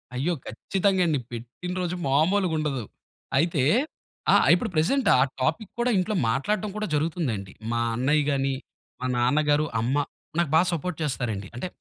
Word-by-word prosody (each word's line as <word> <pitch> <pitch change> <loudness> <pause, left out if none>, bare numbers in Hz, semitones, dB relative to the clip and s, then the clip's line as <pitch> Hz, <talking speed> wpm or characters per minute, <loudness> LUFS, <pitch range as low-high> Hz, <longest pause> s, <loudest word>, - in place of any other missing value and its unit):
అయ్యో! 160 +8 0
ఖచ్చితంగా 195 -1 0
అండి. 150 -4 +1
పెట్టిన 120 +10 -6
రోజు 180 0 -2
మామూలుగుండదు. 155 - +1 0.5
అయితే 155 -2 +2 0.7
ఆ! - - +7 0.2
ఇప్పుడు 175 - +1
ప్రెజెంట్ 230 - +2
ఆ - - +5 0.2
టాపిక్ 160 - 0
కూడా 245 +1 +2
ఇంట్లో 205 +4 0
మాట్లాడటం 205 - 0
కూడా 215 0 -2
జరుగుతుందండి. 145 - -1 0.2
మా 120 - 0 0.2
అన్నయ్య 145 +5 +2
గాని, 135 -1 +1 0.5
మా - - -2
నాన్నగారు, 145 +4 +3
అమ్మ, 120 +5 0 0.4
నాకు 170 -3 +2
బాగా 170 +3 +5
సపోర్ట్ 170 0 -3
చేస్తారండి. 115 -8 -2
అంటే, 125 - -3
155 Hz, 140 wpm, -26 LUFS, 130-180 Hz, 0.7 s, ఆ